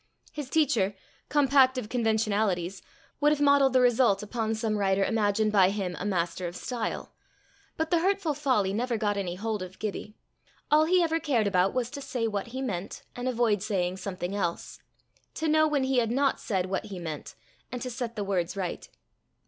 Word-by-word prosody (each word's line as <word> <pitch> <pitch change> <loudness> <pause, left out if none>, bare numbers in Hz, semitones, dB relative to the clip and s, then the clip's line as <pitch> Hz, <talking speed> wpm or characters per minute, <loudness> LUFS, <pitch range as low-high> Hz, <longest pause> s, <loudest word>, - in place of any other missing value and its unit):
His 295 -4 -6
teacher, 250 -12 +2 0.3
compact 275 -2 +4
of 250 - -3
conventionalities, 215 -5 0 0.4
would 295 +1 +4
have 300 - +1
modelled 280 -2 +4
the 255 - +5
result 240 -4 +3
upon 225 0 -2
some 220 -1 -1
writer 195 0 +2
imagined 215 -1 +1
by 190 -3 +5
him 195 -3 -3
a - - -4
master 175 -2 -1
of 175 - -7
style; 235 +3 -4 0.6
but 320 0 -2
the 340 - +4
hurtful 380 -3 +1
folly 255 -10 +1
never 235 +2 -1
got 210 -1 0
any 185 -3 -3
hold 215 +1 -3
of 185 0 -8
Gibbie: 210 0 -5 0.6
all 305 +1 +6
he 360 +2 +4
ever 325 0 +1
cared 250 -9 +1
about 190 -1 +2
was 250 -2 -1
to 285 -1 -6
say 250 -4 -2
what 205 -1 -3
he 260 +3 -5
meant, 195 -6 -4
and 245 +1 -4
avoid 235 -5 +1
saying 190 -4 -1
something 185 0 -4
else; 175 -4 -3 0.6
to 320 - -2
know 310 0 +4
when 290 -3 +1
he 260 -1 +2
had 230 -2 0
not 270 +3 +1
said 190 -4 -1
what 190 +1 -3
he 195 -3 -7
meant, 160 -4 -6 0.4
and 250 - -4
to 255 - -4
set 235 -1 -4
the 210 - -2
words 190 -2 -1
right. 185 -3 -4
220 Hz, 190 wpm, -28 LUFS, 195-265 Hz, 0.6 s, all